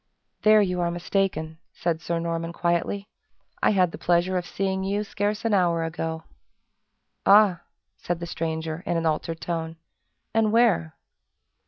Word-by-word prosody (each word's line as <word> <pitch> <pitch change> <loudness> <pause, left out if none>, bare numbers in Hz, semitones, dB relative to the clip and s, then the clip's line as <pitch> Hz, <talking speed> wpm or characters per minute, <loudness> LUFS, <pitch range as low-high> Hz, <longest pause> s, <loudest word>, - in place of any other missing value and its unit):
"There 215 0 +6
you 180 -2 -1
are 170 - +1
mistaken," 170 -2 -1
said 165 -2 -2
Sir 170 +1 -2
Norman, 165 0 -3
quietly 175 +4 -1 0.5
"I - - +4
had 185 -4 +3
the - - -9
pleasure 175 +2 +2
of 175 -1 -2
seeing 190 0 -2
you 200 +2 -1
scarce 205 +1 -2
an 225 - +2
hour 170 -4 +2
ago." 160 0 -4 1.0
"Ah!" 200 -3 +6 0.4
said 175 -1 -3
the 170 - -4
stranger, 160 -1 -3
in 170 - +1
an 165 - -1
altered 160 +1 -1
tone, 165 -1 -3 0.6
"and 220 -1 +3
where?" 215 -9 +3
175 Hz, 150 wpm, -25 LUFS, 165-195 Hz, 1.0 s, There